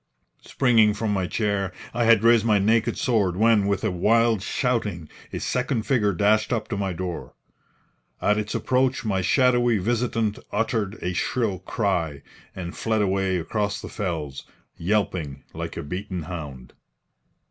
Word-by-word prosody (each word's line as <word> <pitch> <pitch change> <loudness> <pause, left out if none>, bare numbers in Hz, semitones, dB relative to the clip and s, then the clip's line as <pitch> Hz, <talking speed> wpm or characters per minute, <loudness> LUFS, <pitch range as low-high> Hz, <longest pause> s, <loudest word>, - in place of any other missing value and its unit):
Springing 115 -5 +3
from 110 -1 -1
my 95 -2 0
chair, 100 -2 -1 0.2
I 120 0 +1
had 115 -2 +5
raised 115 -1 +5
my 110 -2 +3
naked 110 +3 +2
sword, 105 -8 +1
when, 110 -2 +4
with 100 0 0
a 110 - +1
wild 115 +4 +3
shouting, 105 - -1 0.2
a - - -4
second 125 -2 -1
figure 110 -5 +2
dashed 105 +4 +2
up 115 -3 -1
to 110 - -2
my 100 -1 -1
door. 90 -1 -5 0.8
At 105 +1 +2
its 105 0 -4
approach 130 0 +1
my 95 -3 0
shadowy 120 +2 +3
visitant 115 +1 0
uttered 110 -1 -1
a 90 +1 -1
shrill 105 0 -1
cry, 85 - -2 0.3
and 90 -2 -6
fled 110 -2 0
away 95 -1 +1
across 100 +4 -2
the - - -8
fells, 80 -8 -4 0.3
yelping 85 -7 -1
like - - -6
a - - -4
beaten 90 +3 -5
hound. 75 -7 -8
105 Hz, 150 wpm, -24 LUFS, 90-115 Hz, 0.8 s, had